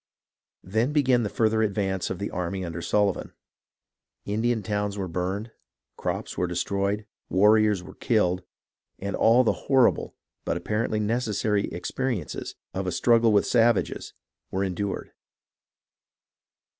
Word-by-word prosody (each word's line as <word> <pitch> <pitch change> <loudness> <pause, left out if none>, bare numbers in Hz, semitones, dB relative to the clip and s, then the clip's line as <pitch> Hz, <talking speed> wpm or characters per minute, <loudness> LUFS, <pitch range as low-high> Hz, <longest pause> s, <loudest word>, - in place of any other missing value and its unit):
Then 110 +9 0
began 130 -5 +3
the 105 - -1
further 110 0 +2
advance 95 -3 0
of 95 - -3
the 100 +2 -4
army 90 +1 -3
under 85 0 -5
Sullivan. 100 +1 0 0.9
Indian 110 +2 0
towns 105 -1 -2
were 95 -2 -2
burned, 95 +6 -3 0.4
crops - - -3
were 90 - 0
destroyed, 100 +4 -1 0.2
warriors 105 0 +4
were - - -11
killed, 90 -6 +1 0.6
and 100 0 -3
all 120 +3 +5
the 115 - +2 0.2
horrible, 130 -3 +3 0.3
but - - -1
apparently 110 0 -1
necessary, 105 -2 0
experiences 105 - -3 0.2
of 95 0 -3
a - - 0
struggle 115 +5 +4
with 100 -1 +4
savages 115 -3 +1 0.3
were 95 +1 -1
endured. 95 +1 -3
105 Hz, 125 wpm, -26 LUFS, 95-115 Hz, 0.9 s, all